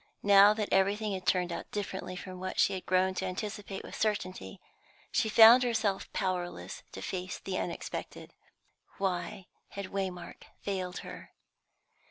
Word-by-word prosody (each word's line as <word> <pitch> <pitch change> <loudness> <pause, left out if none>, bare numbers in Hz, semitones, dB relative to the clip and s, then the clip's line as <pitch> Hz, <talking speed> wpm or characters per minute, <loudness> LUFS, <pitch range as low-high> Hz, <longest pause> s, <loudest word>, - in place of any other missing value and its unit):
Now 200 +1 +7
that 215 -2 -2
everything 200 +2 +2
had 185 -1 -6
turned 180 -1 +2
out - - -5
differently 200 -2 -4
from 185 0 -8
what 185 0 -5
she 200 - +4
had 185 -1 -6
grown 185 +1 +3
to 190 - -3
anticipate 200 +1 -5
with - - -10
certainty, 185 - -2 0.5
she 220 - +1
found 225 +3 +9
herself 220 -5 0
powerless 175 - -3
to 95 - -7
face 185 -1 -4
the 190 -1 -4
unexpected. 170 - -6 0.6
Why 185 -1 -2 0.2
had 200 -2 -7
Waymark 190 -3 -4 0.2
failed 185 -2 -3
her? - - -10
190 Hz, 145 wpm, -31 LUFS, 185-205 Hz, 0.6 s, found